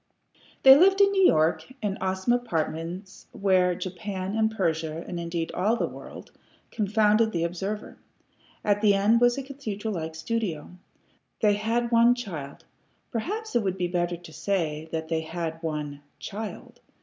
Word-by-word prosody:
They 265 0 +11
lived 385 +6 +5
in 400 0 +6
New 385 -2 +5
York, 160 +10 +2
in 205 -4 -3
awesome 190 +5 +1
apartments 175 -4 -3
wherein 185 -2 +2
Japan 190 +1 -4
and 220 0 +3
Persia, 165 -5 -2
and 175 - -4
indeed 170 -1 -3
all 205 +6 +1
the - - 0
world, - - -11 0.4
confounded 215 +1 +2
the 170 -3 -1
observer. 195 +5 -4 0.6
At 205 -1 +2
the 205 -2 +5
end 215 +4 +3
was 245 +1 +4
a 275 - -3
cathedral 225 -6 -5
like 160 -2 -4
studio. 165 -2 -3 0.7
They 210 -1 +5
had 230 +3 0
one 235 +1 +6
child. 165 - -7 0.5
Perhaps 425 - -3
it 240 - +4
would 190 -2 -2
be 180 -1 0
better 175 0 -1
to 170 -2 -13
say 160 -6 -2
that 160 -1 -3
they 160 0 0
had 165 0 -5
one 150 -3 -4 0.2
CHILD. 215 +2 -7
195 Hz, 155 wpm, -26 LUFS, 165-225 Hz, 0.7 s, They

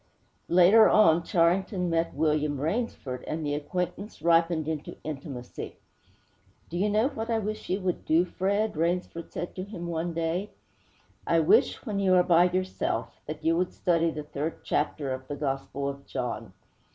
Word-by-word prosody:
Later 185 +6 +7
on, 170 -6 +5
Charrington 180 +1 +1
met 165 -2 0
William 150 -1 +1
Rainsford, 155 - -2
and 155 0 -3
the 145 - -1
acquaintance 180 +7 -4
ripened 165 -2 +3
into 155 -2 -4
intimacy. 135 -4 -7 0.9
'Do 175 - -3
you 205 +2 +2
know 215 +5 +2
what 225 -5 -5
I 230 - +2
wish 215 0 -4
you 190 +2 0
would 185 -1 -2
do, 165 +3 +3
Fred?' 200 +3 -1
Rainsford 170 +1 -2
said 175 - -5
to 185 - -4
him 190 -3 -7
one 170 0 -2
day. 165 +4 -2 0.8
'I 165 -1 +4
wish, 160 - +3
when 210 -4 -2
you 190 -2 +4
are 180 - +6
by 175 -1 +5
yourself, 185 +1 -2
that 155 +1 -6
you 165 +1 +4
would 180 +1 0
study 170 -2 +2
the 155 -2 -5
third 150 +2 -5
chapter 145 -2 -1
of 130 0 -7
the 145 - -4
Gospel 140 0 -3
of 140 0 -8
John!' 125 -1 -4
170 Hz, 165 wpm, -28 LUFS, 155-185 Hz, 0.9 s, Later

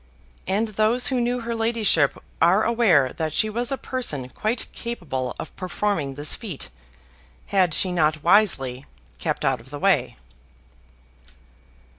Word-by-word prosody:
And 210 +4 0
those 215 +4 +2
who 250 - +1
knew 245 +1 -1
her 235 0 -4
ladyship 225 -10 +2 0.2
are 190 +5 +4
aware 205 - +3
that 160 -2 -2
she 215 - +1
was 240 +3 -1
a 270 - -1
person 150 - -2
quite 220 - -2
capable 140 - -4
of - - -8
performing 180 -6 -2
this 145 +2 +2
feat, 195 - -6 0.8
had 185 -3 +3
she 185 - +1
not 155 -3 +1
wisely 145 -10 +3 0.3
kept - - -2
out - - +1
of 125 - -16
the 145 - -6
way. - - +1
195 Hz, 140 wpm, -23 LUFS, 145-230 Hz, 0.8 s, are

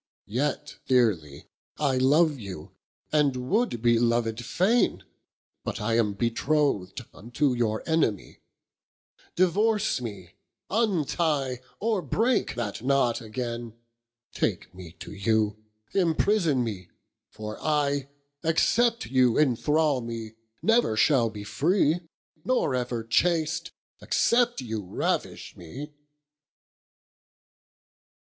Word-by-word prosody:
Yet 130 +7 -3
dearely 95 - +1 0.3
I 140 -3 +1
love 145 +2 +3
you, 95 -7 -8 0.4
and 150 -3 +3 0.2
would 205 - +1
be 120 -1 +4
loved 115 -1 0
faine, 200 - +1 0.6
But - - -4
am 115 -1 +1
betroth'd 120 -2 0
unto 125 +6 -1
your 110 -3 -1
enemie: 160 - 0 1.0
Divorce 205 - +2
mee, 100 -7 -7 0.4
untie, 160 - 0 0.2
or 215 -2 0
breake 225 - 0
that 110 -3 -4
knot 130 -2 +1
againe, 115 0 -5 0.6
Take - - -2
mee 90 -3 -11
to - - -10
you, 105 +1 0 0.3
imprison 170 -5 +2
mee, 100 -6 -5 0.4
for 110 0 -8
I 145 -3 0 0.4
Except 230 +9 +2
you 125 -3 +3
enthrall 150 +1 +2
mee, 115 -2 -6 0.3
never 225 - +3
shall 120 -3 +4
be 105 -1 -8
free, 160 - +1 0.4
Nor 250 - +1
ever 125 -2 -2
chast, 160 +6 +1 0.3
except 235 - +2
you 110 -4 -4
ravish 90 - -3
mee. 135 - -9
130 Hz, 100 wpm, -26 LUFS, 110-160 Hz, 1.0 s, be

